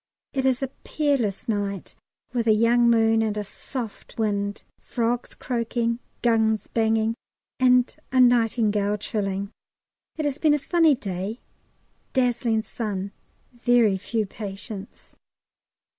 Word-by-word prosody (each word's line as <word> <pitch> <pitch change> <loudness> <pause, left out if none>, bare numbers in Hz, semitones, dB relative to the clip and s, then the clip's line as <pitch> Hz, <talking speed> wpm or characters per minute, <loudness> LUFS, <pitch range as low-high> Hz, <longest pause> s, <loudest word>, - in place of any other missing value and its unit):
It 265 -1 0
is 260 0 +1
a 270 - -1
peerless 275 -10 0
night 200 -4 -2 0.4
with 235 -2 0
a 220 - +6
young 235 +2 +4
moon 225 -1 +4
and 215 -1 -1
a 210 - -1
soft 225 +2 -7
wind, 205 -2 -1 0.2
frogs 240 +1 -2
croaking, 235 -1 -1 0.2
guns 220 -3 +2
banging, 225 0 +1 0.5
and 250 -1 +4 0.2
a 260 - +2
nightingale 225 -4 +3
trilling. 200 -1 -3 0.7
It 310 - -1
has 290 0 -1
been 305 -2 +4
a - - +2
funny 320 0 +3
day, 200 -1 -4 0.7
dazzling 240 -3 +1
sun, 200 -4 -4 0.4
very 240 -5 +3
few 220 +2 -1
patients. 200 0 -8
225 Hz, 120 wpm, -25 LUFS, 210-245 Hz, 0.7 s, a